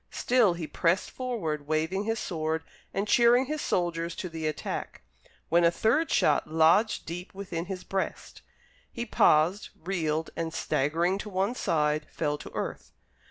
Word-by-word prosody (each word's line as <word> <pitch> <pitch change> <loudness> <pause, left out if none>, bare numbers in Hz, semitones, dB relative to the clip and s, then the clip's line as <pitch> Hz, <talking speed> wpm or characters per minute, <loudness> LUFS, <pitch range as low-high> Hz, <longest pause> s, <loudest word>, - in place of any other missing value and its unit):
Still 235 -8 +2
he 170 -2 -4
pressed 170 +4 0
forward 165 - -3
waving 160 +6 0
his 225 +1 0
sword 160 -4 -2 0.3
and 200 +2 -2
cheering 240 +3 +5
his 300 +2 -3
soldiers 170 -1 -1
to 180 - -5
the 160 -1 -3
attack, 155 - -4 0.5
when 170 +2 +4
a 170 - +6
third 230 - +1
shot 150 -2 +2
lodged 165 +8 +3
deep 180 +4 -7
within 180 -4 -4
his 185 -1 -6
breast. 195 -1 -4 0.5
He 235 - -4
paused, 175 -2 +3
reeled, 160 -3 -2
and 165 -1 -3
staggering 170 +7 0
to 210 - -6
one 195 +4 0
side, 150 -8 0
fell 150 -2 -2
to - - -9
earth. - - -5
175 Hz, 155 wpm, -28 LUFS, 160-205 Hz, 0.5 s, a